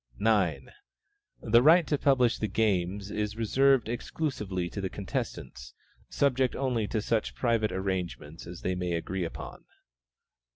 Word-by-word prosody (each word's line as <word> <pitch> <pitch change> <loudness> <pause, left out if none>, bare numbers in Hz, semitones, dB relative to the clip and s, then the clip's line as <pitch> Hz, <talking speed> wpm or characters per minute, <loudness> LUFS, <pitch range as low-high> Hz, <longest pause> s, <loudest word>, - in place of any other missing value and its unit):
9. 105 -6 +1 0.7
The 115 +1 +5
right 165 +5 +6
to 150 - 0
publish 130 -4 +2
the 110 - 0
games 100 -1 0
is 105 0 -2
reserved 135 +3 +3
exclusively 110 - -3
to 100 - -6
the 95 - -2
contestants, 65 -9 -5 0.3
subject 130 -2 +1
only 125 -6 -1
to 110 -1 -2
such 110 -1 -1
private 115 -3 +1
arrangements 90 -5 -4
as 85 0 -9
they 95 - -1
may 90 -1 -2
agree 90 +2 -2
upon. 80 - -8
105 Hz, 135 wpm, -29 LUFS, 95-120 Hz, 0.7 s, right